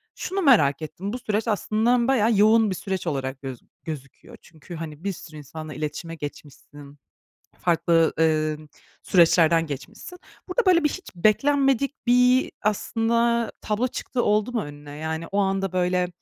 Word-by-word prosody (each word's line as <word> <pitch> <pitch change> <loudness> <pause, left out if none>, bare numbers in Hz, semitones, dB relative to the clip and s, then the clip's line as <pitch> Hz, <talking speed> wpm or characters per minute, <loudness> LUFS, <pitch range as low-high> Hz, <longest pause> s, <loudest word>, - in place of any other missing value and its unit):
şunu 385 +2 -3
merak 200 - +4
ettim, 190 +6 -6
bu 250 - -4
süreç 215 -1 -2
aslında 225 +3 +1
bayağı 230 -4 +3
yoğun 215 +1 +5
bir 190 - -2
süreç 190 -1 -4
olarak 135 -3 -3
göz 130 -3 -6 0.3
gözüküyor, 140 -4 -9
çünkü 165 +2 -12
hani 160 -1 -8
bir 200 0 -2
sürü 155 -2 -11
insanla 155 +1 -8
iletişime 150 +3 -5
geçmişsin, 145 -1 -10 0.6
farklı, 165 -1 +2
eee, 155 -1 +2 0.5
süreçlerden 165 -2 +4
geçmişsin. 210 - -8 0.3
Burada 405 +6 0
böyle 355 -3 +4
bir 300 - +3
hiç 380 - -8
beklenmedik 275 +7 +1
bir 250 +1 +4
aslında 230 +2 +1
tablo 215 +4 0
çıktığı 250 0 -3
oldu 210 +3 +1
mu 235 -3 -1
önüne? 145 0 -10
Yani 160 +1 -4
o 200 - -1
anda, 195 -1 0
böyle, 180 0 +1
190 Hz, 150 wpm, -24 LUFS, 155-235 Hz, 0.6 s, yoğun